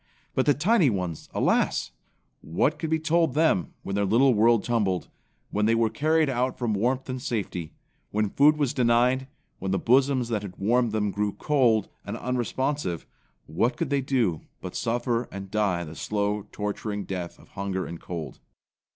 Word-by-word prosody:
But 130 Hz, -, +1 dB
the 145 Hz, -, +5 dB
tiny 175 Hz, -, +4 dB
ones, 90 Hz, -7 st, -3 dB
alas! -, -, +1 dB, 0.5 s
What 85 Hz, -, 0 dB
could 160 Hz, -, -3 dB
be 160 Hz, -, +2 dB
told 160 Hz, -2 st, +1 dB
them 150 Hz, -, +2 dB
when 100 Hz, -, -4 dB
their 100 Hz, -, +1 dB
little 120 Hz, +7 st, +4 dB
world 115 Hz, 0 st, +4 dB
tumbled, 100 Hz, -7 st, 0 dB, 0.4 s
when 105 Hz, +1 st, +1 dB
they 115 Hz, -, +4 dB
were 115 Hz, -1 st, +2 dB
carried 155 Hz, +6 st, +2 dB
out 130 Hz, -1 st, 0 dB
from 120 Hz, -3 st, -1 dB
warmth 125 Hz, +6 st, 0 dB
and 130 Hz, -1 st, -4 dB
safety, 100 Hz, -, -3 dB, 0.4 s
when 105 Hz, -1 st, 0 dB
food 150 Hz, +2 st, +5 dB
was 145 Hz, -4 st, 0 dB
denied; 125 Hz, +2 st, +3 dB, 0.3 s
when 95 Hz, -, -3 dB
the 95 Hz, -, +1 dB
bosoms 130 Hz, +1 st, +3 dB
that 110 Hz, -3 st, 0 dB
had 100 Hz, -3 st, -8 dB
warmed 120 Hz, +3 st, +2 dB
them 105 Hz, -1 st, 0 dB
grew 105 Hz, +1 st, -1 dB
cold 125 Hz, -8 st, +2 dB, 0.2 s
and -, -, -5 dB
unresponsive, 125 Hz, -, -2 dB, 0.4 s
what 90 Hz, +11 st, 0 dB
could -, -, -2 dB
they 140 Hz, -1 st, +2 dB
do 120 Hz, -, 0 dB, 0.2 s
but 90 Hz, -, -7 dB
suffer 120 Hz, 0 st, -1 dB
and 95 Hz, -1 st, -7 dB
die 100 Hz, -5 st, +1 dB
the 80 Hz, -1 st, -9 dB
slow, 105 Hz, +1 st, -2 dB
torturing 105 Hz, 0 st, -3 dB
death 90 Hz, -3 st, -5 dB
of -, -, -19 dB
hunger 95 Hz, -1 st, -3 dB
and 85 Hz, 0 st, -8 dB
cold? 85 Hz, -3 st, -6 dB
115 Hz, 175 wpm, -26 LUFS, 100-130 Hz, 0.5 s, the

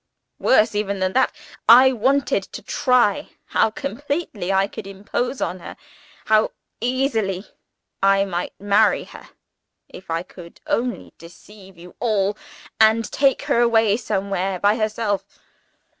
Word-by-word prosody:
Worse 220 Hz, -3 st, +3 dB
even 205 Hz, -1 st, -2 dB
than 185 Hz, 0 st, -1 dB
that, 260 Hz, -, +2 dB, 0.4 s
I 255 Hz, +3 st, +8 dB
wanted 265 Hz, +4 st, +1 dB
to -, -, -8 dB
try 250 Hz, -6 st, +1 dB, 0.2 s
how 220 Hz, -, +2 dB
completely 275 Hz, -, -4 dB
I 195 Hz, 0 st, +3 dB
could 195 Hz, -, -9 dB
impose 205 Hz, +6 st, -4 dB
on 185 Hz, -, -2 dB
her -, -, -10 dB, 0.5 s
how 215 Hz, 0 st, +2 dB, 0.3 s
easily 225 Hz, -6 st, -1 dB, 0.6 s
I 195 Hz, 0 st, +4 dB
might 175 Hz, -2 st, -5 dB
marry 205 Hz, +1 st, +3 dB
her, -, -, -14 dB, 0.6 s
if 185 Hz, -, -13 dB
I 165 Hz, +1 st, -1 dB
could 175 Hz, -2 st, -14 dB
only 245 Hz, +1 st, -2 dB
deceive 190 Hz, +2 st, -15 dB
you 175 Hz, +1 st, -14 dB
all, 210 Hz, -4 st, 0 dB, 0.4 s
and 220 Hz, +1 st, +3 dB
take 275 Hz, -2 st, +2 dB
her -, -, +1 dB
away 225 Hz, -3 st, +3 dB
somewhere 195 Hz, -4 st, -2 dB
by 205 Hz, +3 st, +3 dB
herself. 215 Hz, -3 st, -1 dB
210 Hz, 130 wpm, -21 LUFS, 195-235 Hz, 0.6 s, I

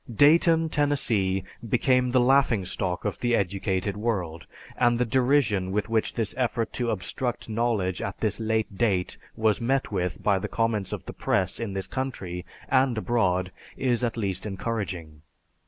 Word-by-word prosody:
Dayton, 160 Hz, +6 st, +5 dB
Tennessee, 115 Hz, -11 st, +1 dB, 0.3 s
became 125 Hz, +2 st, +3 dB
the 125 Hz, +1 st, +3 dB
laughingstock 115 Hz, -9 st, +1 dB
of 105 Hz, -, -2 dB
the 120 Hz, -1 st, +2 dB
educated 95 Hz, 0 st, -1 dB
world, 95 Hz, -7 st, -2 dB, 0.3 s
and 120 Hz, -1 st, +3 dB
the 125 Hz, -, +1 dB
derision 125 Hz, -6 st, +2 dB
with 105 Hz, +2 st, -1 dB
which 115 Hz, -1 st, 0 dB
this 115 Hz, -4 st, -1 dB
effort 120 Hz, -2 st, 0 dB
to 120 Hz, -1 st, -1 dB
obstruct 115 Hz, +4 st, -3 dB
knowledge 110 Hz, -5 st, 0 dB
at -, -, -4 dB
this -, -, 0 dB
late 110 Hz, -2 st, -1 dB
date 95 Hz, -6 st, +1 dB, 0.2 s
was 110 Hz, 0 st, +1 dB
met 135 Hz, +2 st, 0 dB
with 90 Hz, -3 st, -2 dB
by 100 Hz, -2 st, +3 dB
the -, -, -3 dB
comments 115 Hz, -4 st, 0 dB
of -, -, -5 dB
the -, -, -7 dB
press 95 Hz, -1 st, 0 dB
in 115 Hz, -4 st, -3 dB
this 95 Hz, -1 st, -2 dB
country 95 Hz, -10 st, -4 dB, 0.2 s
and 130 Hz, -3 st, +2 dB
abroad 95 Hz, -6 st, +1 dB, 0.3 s
is 125 Hz, -2 st, +1 dB
at 120 Hz, -1 st, -1 dB
least 100 Hz, -2 st, -2 dB
encouraging. 95 Hz, -7 st, -4 dB
110 Hz, 155 wpm, -26 LUFS, 95-125 Hz, 0.3 s, Dayton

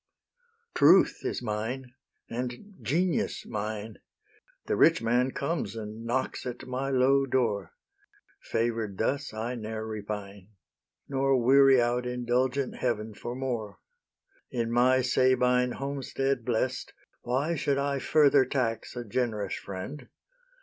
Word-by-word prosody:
Truth -, -, +5 dB
is -, -, -3 dB
mine, 120 Hz, +4 st, -3 dB, 0.3 s
and 125 Hz, -, -5 dB
Genius 175 Hz, +4 st, 0 dB
mine; 110 Hz, 0 st, -5 dB, 0.7 s
The -, -, 0 dB
rich 165 Hz, -, +5 dB
man 120 Hz, +3 st, +2 dB
comes, 140 Hz, +1 st, -3 dB
and 110 Hz, +1 st, -7 dB
knocks 125 Hz, +3 st, -1 dB
at 125 Hz, 0 st, -6 dB
my 130 Hz, +2 st, -3 dB
low 135 Hz, +1 st, +3 dB
door: 110 Hz, -8 st, 0 dB, 0.7 s
Favour'd 115 Hz, -3 st, -2 dB
thus, 140 Hz, +5 st, -1 dB
I 110 Hz, +3 st, -3 dB
ne'er 110 Hz, -2 st, -5 dB
repine, 105 Hz, -3 st, -6 dB, 0.6 s
Nor 135 Hz, -1 st, +2 dB
weary 135 Hz, +2 st, +6 dB
out 120 Hz, +1 st, +1 dB
indulgent 125 Hz, +2 st, 0 dB
Heaven 110 Hz, -3 st, -2 dB
for 120 Hz, +4 st, -6 dB
more: 125 Hz, -5 st, -3 dB, 0.7 s
In 115 Hz, -2 st, -2 dB
my 130 Hz, +2 st, +4 dB
Sabine 125 Hz, -1 st, +3 dB
homestead 135 Hz, -2 st, -2 dB
blest, 125 Hz, +1 st, -1 dB, 0.3 s
Why 135 Hz, +7 st, 0 dB
should 140 Hz, -3 st, 0 dB
I 140 Hz, 0 st, 0 dB
further 145 Hz, -1 st, +5 dB
tax 120 Hz, -4 st, -2 dB
a 120 Hz, -, -4 dB
generous 105 Hz, -3 st, -1 dB
friend? 100 Hz, +10 st, -7 dB
125 Hz, 120 wpm, -28 LUFS, 110-135 Hz, 0.7 s, weary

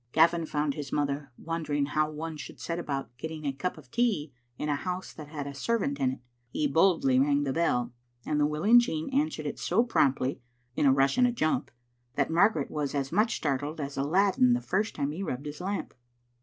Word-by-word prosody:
Gavin 165 Hz, +1 st, +4 dB
found 150 Hz, -1 st, 0 dB
his 145 Hz, -2 st, -6 dB
mother 145 Hz, -1 st, -1 dB
wondering 155 Hz, -3 st, -1 dB
how 155 Hz, +1 st, 0 dB
one 155 Hz, +1 st, -5 dB
should 150 Hz, -, -9 dB
set 170 Hz, 0 st, -3 dB
about 135 Hz, -7 st, -4 dB
getting 160 Hz, -1 st, -6 dB
a 140 Hz, -, 0 dB
cup 160 Hz, +7 st, -3 dB
of -, -, -15 dB
tea 215 Hz, -, 0 dB, 0.2 s
in 150 Hz, -, -3 dB
a 150 Hz, -, +1 dB
house 180 Hz, +5 st, -4 dB
that 155 Hz, -, -9 dB
had 145 Hz, -2 st, -5 dB
a 140 Hz, -, -6 dB
servant 145 Hz, -2 st, -1 dB
in 130 Hz, -1 st, +1 dB
it. -, -, -9 dB, 0.3 s
He 150 Hz, -, -1 dB
boldly 155 Hz, -4 st, +3 dB
rang 145 Hz, +1 st, +3 dB
the 135 Hz, -2 st, -1 dB
bell, 125 Hz, -7 st, +1 dB, 0.3 s
and 150 Hz, -, 0 dB
the 145 Hz, -, +4 dB
willing 175 Hz, +11 st, +5 dB
Jean 160 Hz, -5 st, -2 dB
answered 295 Hz, +4 st, 0 dB
it -, -, -4 dB
so 230 Hz, -, +2 dB
promptly 135 Hz, -, +1 dB, 0.3 s
(in 145 Hz, -, +3 dB
a -, -, +7 dB
rush 135 Hz, -, +3 dB
and 245 Hz, -1 st, +4 dB
jump) 155 Hz, -7 st, 0 dB, 0.5 s
that 140 Hz, +2 st, +1 dB
Margaret 170 Hz, -3 st, +3 dB
was 145 Hz, -2 st, -2 dB
as 135 Hz, -1 st, -1 dB
much 215 Hz, +6 st, +2 dB
startled 145 Hz, +2 st, -2 dB
as 140 Hz, -1 st, -4 dB
Aladdin 150 Hz, -3 st, +3 dB
the 120 Hz, -, +2 dB
first 190 Hz, -, -1 dB
time 145 Hz, -1 st, -1 dB
he 165 Hz, +6 st, -5 dB
rubbed 140 Hz, -7 st, -4 dB
his 150 Hz, +2 st, -6 dB
lamp. 195 Hz, +2 st, -3 dB
150 Hz, 210 wpm, -29 LUFS, 140-170 Hz, 0.5 s, a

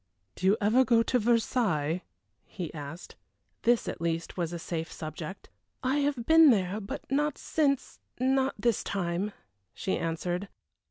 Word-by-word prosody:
"Do 185 Hz, -, -1 dB
you 200 Hz, +3 st, +5 dB
ever 220 Hz, +5 st, +4 dB
go 230 Hz, -2 st, +4 dB
to 250 Hz, -, +1 dB
Versailles?" 210 Hz, -, +1 dB, 0.5 s
he 175 Hz, -5 st, -6 dB
asked. 150 Hz, +3 st, -8 dB, 0.4 s
This, 240 Hz, 0 st, +3 dB
at -, -, -4 dB
least, 165 Hz, 0 st, -2 dB
was 170 Hz, -2 st, -2 dB
a 175 Hz, -, -3 dB
safe 165 Hz, -1 st, -4 dB
subject. 155 Hz, +4 st, -7 dB, 0.4 s
"I 260 Hz, +3 st, +2 dB
have 280 Hz, -5 st, 0 dB
been 320 Hz, 0 st, +8 dB
there 200 Hz, -3 st, +2 dB
but 195 Hz, -, -6 dB
not 295 Hz, +2 st, +1 dB
since 280 Hz, -4 st, 0 dB, 0.2 s
not 265 Hz, +1 st, +2 dB
this 230 Hz, +1 st, +1 dB
time," 185 Hz, +1 st, -1 dB, 0.4 s
she 190 Hz, -, -1 dB
answered. 175 Hz, +3 st, -2 dB
205 Hz, 150 wpm, -29 LUFS, 170-255 Hz, 0.5 s, been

